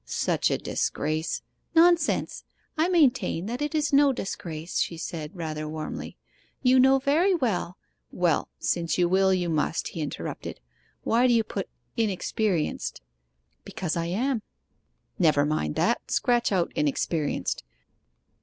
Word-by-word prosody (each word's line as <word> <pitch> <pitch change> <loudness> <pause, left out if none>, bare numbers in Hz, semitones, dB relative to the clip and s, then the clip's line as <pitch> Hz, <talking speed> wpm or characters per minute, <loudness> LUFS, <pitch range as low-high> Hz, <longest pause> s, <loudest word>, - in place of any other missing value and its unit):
'Such - - 0
a - - +1
disgrace 155 +2 -2
' - - -42
'Nonsense! 335 -1 +3 0.3
I 320 +3 +2
maintain 270 - +2
that 240 +6 -4
it 295 +2 -2
is 300 -1 0
no 280 0 +6
disgrace!' 175 -8 -4
she 170 - -1
said, 160 -1 -6
rather 155 -3 -4
warmly. 155 0 -6 0.5
'You 255 0 +5
know 265 +1 +6
very 315 +8 +3
well 210 - -1 0.2
' - - -48
'Well, 175 -2 +1
since 170 -3 -1
you 175 -1 +3
will, 190 +2 +3
you 180 -2 +1
must,' 160 0 0
he 165 - -5
interrupted. 145 -3 -5 0.4
'Why 240 +2 +3
do 245 - +4
you 230 -1 +4
put 200 -3 -5 0.3
"inexperienced?"' 205 -4 -1 0.6
'Because 175 -5 -3
I 170 0 -1
am.' 235 +7 0 0.8
'Never 150 -5 +4
mind 75 - -1
that - - 0
scratch 240 -2 +2
out 180 -3 +1
"inexperienced." 150 +1 -1
190 Hz, 140 wpm, -26 LUFS, 160-260 Hz, 0.8 s, no